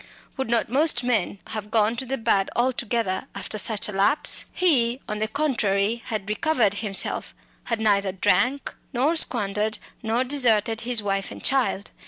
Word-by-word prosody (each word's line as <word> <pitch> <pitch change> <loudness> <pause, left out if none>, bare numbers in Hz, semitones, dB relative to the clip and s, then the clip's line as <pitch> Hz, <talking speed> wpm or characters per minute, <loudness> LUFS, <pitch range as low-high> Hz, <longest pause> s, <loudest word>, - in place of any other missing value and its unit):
Would 265 -4 -3
not 235 -1 +2
most 270 0 +2
men 225 -6 0
have 210 -1 -5
gone 220 +1 +2
to 260 - -4
the 270 +2 -2
bad 210 -4 +1
altogether, 235 -5 0
after 215 - -3
such 215 0 +1
a - - -4
lapse? 205 +10 +2
He, 255 -9 +2
on 210 0 -4
the 215 - 0
contrary, 230 -6 0
had 215 -4 -4
recovered 220 -2 +1
himself, 200 -1 -1 0.3
had 230 -2 -2
neither 200 -3 +2
drunk 200 +8 +1 0.2
nor 275 +7 +2
squandered, 215 -6 +1 0.2
nor 230 +2 0
deserted 230 -5 +2
his 235 -2 +1
wife 195 -1 -1
and - - -10
child. 255 -7 +1
225 Hz, 160 wpm, -24 LUFS, 205-250 Hz, 0.3 s, not